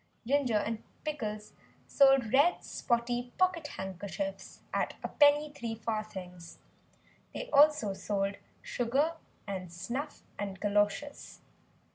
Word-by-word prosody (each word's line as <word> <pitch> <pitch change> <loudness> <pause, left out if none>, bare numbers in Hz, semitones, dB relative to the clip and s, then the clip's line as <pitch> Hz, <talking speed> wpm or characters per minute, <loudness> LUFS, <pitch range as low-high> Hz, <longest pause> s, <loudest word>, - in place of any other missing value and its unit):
Ginger 265 -2 +2
and 220 +1 -2 0.2
Pickles 215 -8 -4 0.3
sold 270 -5 +4
red 290 +7 +4
spotty 240 0 -1
pocket 370 -4 +2
handkerchiefs 190 - -5
at - - 0
a - - -1
penny 295 0 +4
three 230 -5 -4
farthings. 205 -6 -5 0.8
They - - -5
also 290 -8 +5
sold 195 0 -1 0.3
sugar, 275 +7 0 0.3
and 185 -4 -5
snuff 255 - -5 0.2
and 195 -2 -4
galoshes. 205 +8 -1
235 Hz, 105 wpm, -31 LUFS, 205-290 Hz, 0.8 s, also